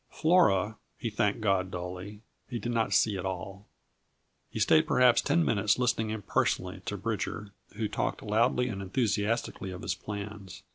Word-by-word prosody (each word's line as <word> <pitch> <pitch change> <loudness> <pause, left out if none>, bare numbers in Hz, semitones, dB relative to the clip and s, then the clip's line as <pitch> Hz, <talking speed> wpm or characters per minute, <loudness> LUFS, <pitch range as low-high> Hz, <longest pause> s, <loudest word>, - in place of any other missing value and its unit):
Flora, 110 - +3 0.2
he 115 - -3
thanked 105 +1 0
God 95 -3 +1
dully, 90 +3 -6 0.3
he 120 - -3
did 120 +2 -3
not 115 -2 0
see 105 -3 +3
at - - -4
all. 95 +1 -5 0.8
He - - -5
stayed 80 -1 +4
perhaps 125 -2 +5
ten 170 -1 +2
minutes 105 -2 +2
listening 115 -3 +1
impersonally 100 -3 -1
to 105 - -3
Bridger, 105 0 -3 0.2
who 110 - -1
talked - - -2
loudly 120 +4 +2
and 100 -5 -4
enthusiastically 105 0 -1
of 90 -1 -7
his 90 - 0
plans. 100 0 -7
105 Hz, 155 wpm, -29 LUFS, 95-115 Hz, 0.8 s, perhaps